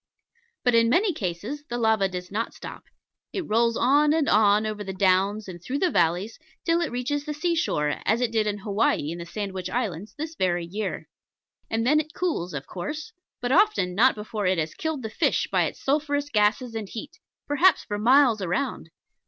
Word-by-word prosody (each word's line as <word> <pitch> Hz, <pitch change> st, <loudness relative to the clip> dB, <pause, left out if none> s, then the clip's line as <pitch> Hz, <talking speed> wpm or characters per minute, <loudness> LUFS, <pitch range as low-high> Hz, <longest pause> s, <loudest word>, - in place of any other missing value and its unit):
But 245 Hz, -, +3 dB
in 230 Hz, 0 st, +4 dB
many 380 Hz, -, +3 dB
a -, -, 0 dB
case 175 Hz, -, -4 dB, 0.3 s
the 240 Hz, -, -2 dB
lava 220 Hz, -4 st, +2 dB
does 180 Hz, 0 st, -6 dB
not 220 Hz, +3 st, -3 dB
stop. -, -, -9 dB, 0.5 s
It 370 Hz, -5 st, -3 dB
rolls 230 Hz, +1 st, +2 dB
on 295 Hz, +4 st, +4 dB
and 315 Hz, -2 st, +1 dB
on 210 Hz, 0 st, +4 dB
over 215 Hz, -1 st, -3 dB
the 190 Hz, -1 st, -5 dB
downs 195 Hz, +2 st, +2 dB
and 175 Hz, -2 st, -9 dB
through 255 Hz, +10 st, -3 dB
the 355 Hz, +3 st, +1 dB
valleys, 175 Hz, +6 st, +1 dB, 0.3 s
till 335 Hz, 0 st, +2 dB
it 340 Hz, -, -2 dB
reaches 260 Hz, +4 st, -2 dB
the 300 Hz, 0 st, -5 dB
sea 340 Hz, +3 st, 0 dB
shore, 150 Hz, -, 0 dB
as 220 Hz, +3 st, +2 dB
it 245 Hz, -2 st, 0 dB
did 220 Hz, -2 st, +1 dB
in 205 Hz, 0 st, -1 dB
Hawaii 200 Hz, -6 st, 0 dB
in 170 Hz, -, -6 dB
the 170 Hz, -, -7 dB
Sandwich 190 Hz, -1 st, -4 dB
Islands 210 Hz, -5 st, -3 dB
this 315 Hz, +2 st, -5 dB
very 175 Hz, -, 0 dB
year. 200 Hz, +3 st, -4 dB, 0.6 s
And 225 Hz, +1 st, 0 dB
then 300 Hz, +4 st, +4 dB
it 310 Hz, +1 st, -5 dB
cools, 185 Hz, -, -2 dB
of 140 Hz, -, -5 dB
course; 300 Hz, -, -6 dB, 0.3 s
but 245 Hz, +1 st, -1 dB
often 365 Hz, -, +3 dB
not 240 Hz, +8 st, +4 dB
before 210 Hz, -1 st, -3 dB
it 185 Hz, 0 st, +2 dB
has 155 Hz, -1 st, -2 dB
killed 315 Hz, -5 st, -3 dB
the 220 Hz, -, -4 dB
fish -, -, +1 dB
by -, -, +3 dB
its -, -, -6 dB
sulphurous 290 Hz, 0 st, 0 dB
gases 220 Hz, +2 st, +1 dB
and 220 Hz, -3 st, -5 dB
heat, 295 Hz, +8 st, -8 dB, 0.3 s
perhaps 315 Hz, +6 st, +4 dB
for 205 Hz, -1 st, -4 dB
miles 245 Hz, -1 st, +5 dB
around. 185 Hz, +9 st, -2 dB
225 Hz, 200 wpm, -25 LUFS, 190-290 Hz, 0.6 s, miles